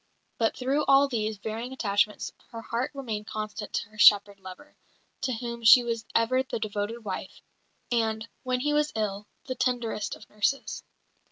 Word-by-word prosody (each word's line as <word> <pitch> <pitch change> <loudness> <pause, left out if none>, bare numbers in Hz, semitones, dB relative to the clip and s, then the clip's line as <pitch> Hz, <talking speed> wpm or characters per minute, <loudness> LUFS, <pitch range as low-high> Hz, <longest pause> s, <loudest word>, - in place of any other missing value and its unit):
But 225 -1 +1
through 270 +4 +1
all 275 +1 +6
these 220 -4 -2
varying 220 +4 -5
attachments 210 -3 0 0.2
her 230 -1 -8
heart 235 +3 -2
remained 220 -6 -4
constant 215 -1 -5
to - - -2
her 215 0 -16
shepherd 205 -1 +6
lover, 190 +10 -12 0.5
to 255 - -1
whom 235 0 -5
she 230 +3 +9
was 230 -2 -3
ever 240 +3 +3
the 260 - -4
devoted 215 +1 -4
wife, 190 -1 -6 0.5
and, 225 -1 0
when 255 -1 -1
he 295 +2 +1
was 300 0 +2
ill, 205 -1 -2 0.2
the 260 - -3
tenderest 240 -5 -1
of - - -15
nurses. 210 +6 -1
225 Hz, 165 wpm, -27 LUFS, 210-255 Hz, 0.5 s, she